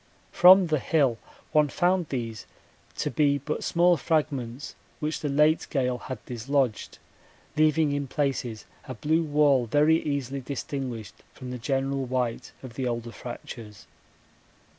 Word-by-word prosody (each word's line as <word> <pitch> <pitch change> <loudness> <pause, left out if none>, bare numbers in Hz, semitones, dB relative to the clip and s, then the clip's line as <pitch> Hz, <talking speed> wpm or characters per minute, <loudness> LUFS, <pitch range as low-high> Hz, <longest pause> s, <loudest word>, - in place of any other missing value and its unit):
From 185 +1 +8
the 155 -3 0
hill 135 -6 +1 0.3
one 150 -1 +3
found 175 +3 +1
these 115 -5 -4 0.5
to - - -1
be 140 +2 +2
but 145 +3 -4
small 175 0 +3
fragments 140 -6 -2 0.3
which 155 +1 -2
the 150 - -3
late 150 +3 +3
gale 125 -3 0
had 130 -5 -8
dislodged, 125 -1 -1 0.6
leaving 155 -1 +3
in 145 -1 -2
places 130 -6 -2 0.2
a 130 - -6
blue 155 +8 +1
wall 145 -5 +3
very 150 +6 +3
easily 140 -2 -3
distinguished 130 -5 -5
from 125 -1 -8
the 125 - -5
general 135 +2 -1
white 125 -1 -2
of 130 -3 -9
the 130 +1 -3
older 120 -1 -3
fractures. 115 -4 -9
140 Hz, 140 wpm, -26 LUFS, 125-150 Hz, 0.6 s, From